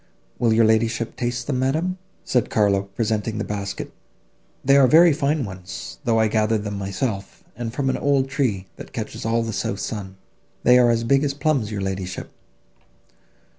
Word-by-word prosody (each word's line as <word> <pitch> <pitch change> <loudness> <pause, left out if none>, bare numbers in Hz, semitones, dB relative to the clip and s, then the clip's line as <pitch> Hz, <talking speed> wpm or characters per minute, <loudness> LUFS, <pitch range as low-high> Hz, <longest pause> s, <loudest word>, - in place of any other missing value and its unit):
Will 115 -2 +3
your 110 0 +5
ladyship 110 +1 +1
taste 120 0 -2
them, 130 -2 -1
madam?" 160 +8 0 0.3
said 125 - +1
Carlo, 100 -2 +2
presenting 110 0 -1
the 115 - -1
basket, 100 -1 -5 0.7
"they 135 +1 +5
are 140 -2 +7
very 165 +3 +7
fine 145 -1 0
ones, 95 - -8
though 115 -1 +3
I 110 - +4
gathered 110 0 +1
them 105 -1 -4
myself, 100 +1 -4
and 115 0 -4
from 135 +3 -2
an 130 - +1
old 140 -2 +2
tree, 125 -9 -1
that - - -11
catches - - -5
all 115 +1 +1
the 115 -1 -4
south 100 0 -2
sun; 100 -1 -5 0.5
they 125 0 +6
are 120 -1 +5
as 115 0 +2
big 135 +4 +3
as 140 -1 -1
plums, 140 -7 0
your 100 -2 -3
ladyship." 95 -1 -4
115 Hz, 175 wpm, -23 LUFS, 105-135 Hz, 0.7 s, are